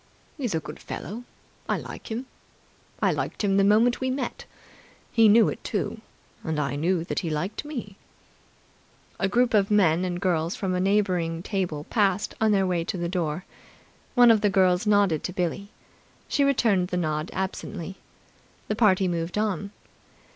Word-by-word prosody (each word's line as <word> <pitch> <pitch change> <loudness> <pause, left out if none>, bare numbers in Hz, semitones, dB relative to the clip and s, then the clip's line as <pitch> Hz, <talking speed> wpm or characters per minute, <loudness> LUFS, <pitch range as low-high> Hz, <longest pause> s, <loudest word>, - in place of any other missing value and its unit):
"He's 250 - -2
a - - +1
good 150 - -9
fellow. 225 +7 -7 0.4
I - - +2
like - - -9
him. 235 +4 -4 0.8
I - - +4
liked - - -3
him 195 -1 +2
the 200 - +4
moment 225 +5 +4
we 260 - 0
met. 255 -2 -3 0.7
He 225 -2 +5
knew 220 +2 +6
it, - - -4
too. - - -3 0.4
And 160 -2 -2
I 140 -1 -1
knew 165 +3 0
he 170 - -3
liked 160 - -3
me." 235 -10 -6 1.2
A 190 - +1
group 245 +3 +2
of 200 -2 +3
men 185 -5 +3
and 175 -1 -2
girls 170 -2 0
from 190 -2 -2
a 180 - 0
neighbouring 180 -4 +1
table 180 -8 -2
passed 200 +1 0
on 220 -1 +4
their 195 -2 +3
way 175 -2 0
to 185 - -4
the 175 -1 -2
door. 175 -1 -2 0.7
One 245 -2 +8
of 220 -2 +3
the 210 - +3
girls 185 0 +3
nodded 200 -7 +3
to 180 - -4
Billie. 190 +2 -2 0.6
She 285 - +1
returned 225 -10 +2
the 180 - -2
nod 155 -2 -1
absently. 190 -1 -5 0.7
The 215 - 0
party 195 -4 +3
moved 170 +1 -2
on. 200 -2 -1
190 Hz, 170 wpm, -26 LUFS, 175-210 Hz, 1.2 s, One